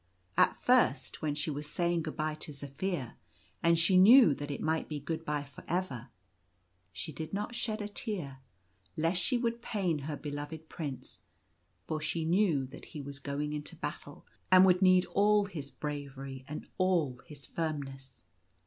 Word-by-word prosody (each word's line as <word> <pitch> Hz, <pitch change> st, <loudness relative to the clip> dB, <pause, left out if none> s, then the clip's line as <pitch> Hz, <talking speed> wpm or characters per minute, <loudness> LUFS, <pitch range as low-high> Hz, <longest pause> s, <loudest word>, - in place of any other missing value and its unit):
At -, -, +4 dB
first, -, -, +2 dB
when 150 Hz, -2 st, 0 dB
she 150 Hz, +1 st, -2 dB
was 145 Hz, +1 st, -4 dB
saying 170 Hz, +1 st, +1 dB
good 155 Hz, -1 st, -5 dB
bye 155 Hz, 0 st, 0 dB
to 155 Hz, 0 st, -8 dB
Zaphir 140 Hz, 0 st, -4 dB, 0.2 s
— -, -, -34 dB
and 170 Hz, 0 st, +4 dB
she 170 Hz, +3 st, +4 dB
knew 210 Hz, -, +9 dB
that 145 Hz, +1 st, -6 dB
it 140 Hz, -, -3 dB
might 160 Hz, 0 st, 0 dB
be 150 Hz, -1 st, -3 dB
good 160 Hz, +3 st, -4 dB
bye 150 Hz, -2 st, -1 dB
for 140 Hz, -2 st, -13 dB
ever 150 Hz, -9 st, -2 dB, 0.4 s
— 90 Hz, 0 st, -42 dB, 0.3 s
she 90 Hz, -, -5 dB
did 155 Hz, +5 st, -6 dB
not 210 Hz, +4 st, -3 dB
shed 220 Hz, -3 st, -2 dB
a -, -, -3 dB
tear, 185 Hz, -, -4 dB, 0.6 s
lest 165 Hz, +3 st, +1 dB
she 240 Hz, +7 st, +1 dB
should 235 Hz, -1 st, -1 dB
pain 185 Hz, -9 st, -1 dB
her 145 Hz, +1 st, -4 dB
beloved 145 Hz, +2 st, -6 dB
Prince, 130 Hz, -, -6 dB, 0.6 s
for 155 Hz, -1 st, -3 dB
she 160 Hz, +1 st, -1 dB
knew 170 Hz, -5 st, +3 dB
that 130 Hz, -, -11 dB
he 150 Hz, -, -9 dB
was 140 Hz, 0 st, -7 dB
going 145 Hz, +1 st, -3 dB
into 150 Hz, -1 st, -5 dB
battle, -, -, -7 dB, 0.3 s
and 185 Hz, 0 st, +9 dB
would 180 Hz, 0 st, +4 dB
need 185 Hz, -1 st, +6 dB
all 205 Hz, +1 st, +3 dB
his 155 Hz, -8 st, -6 dB
bravery 135 Hz, -3 st, -6 dB
and 150 Hz, -, -6 dB
all 170 Hz, -9 st, +2 dB
his 145 Hz, -4 st, -10 dB
firmness. 135 Hz, -, -5 dB
155 Hz, 175 wpm, -32 LUFS, 140-180 Hz, 0.6 s, knew